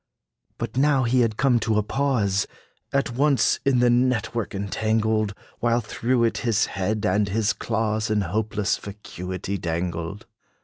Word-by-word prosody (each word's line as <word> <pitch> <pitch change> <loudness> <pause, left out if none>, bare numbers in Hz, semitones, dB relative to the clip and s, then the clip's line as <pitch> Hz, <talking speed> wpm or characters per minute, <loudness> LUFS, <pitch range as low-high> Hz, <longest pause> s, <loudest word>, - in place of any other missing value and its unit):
But - - -5
now 140 -1 +3
had 120 - -1
he 125 -2 +5
come 130 -3 +3
to 110 -1 0
a 105 - +2
pause, 105 -5 0 0.4
At 140 -3 0
once 140 -1 +3
in 135 -2 +3
the 125 - +5
net 125 -1 +1
work 115 -4 -3
entangled, 110 +1 0 0.2
While 120 0 +2
through 120 +3 0
it 115 - +1
his 115 -3 +2
head 105 +2 -2
and 105 -1 +2
his 110 +1 +1
claws 110 -1 -1
In 105 -1 +2
hopeless 105 +2 -1
vacuity 95 -1 -6
dangled. 85 +2 -3
110 Hz, 150 wpm, -24 LUFS, 100-120 Hz, 0.4 s, he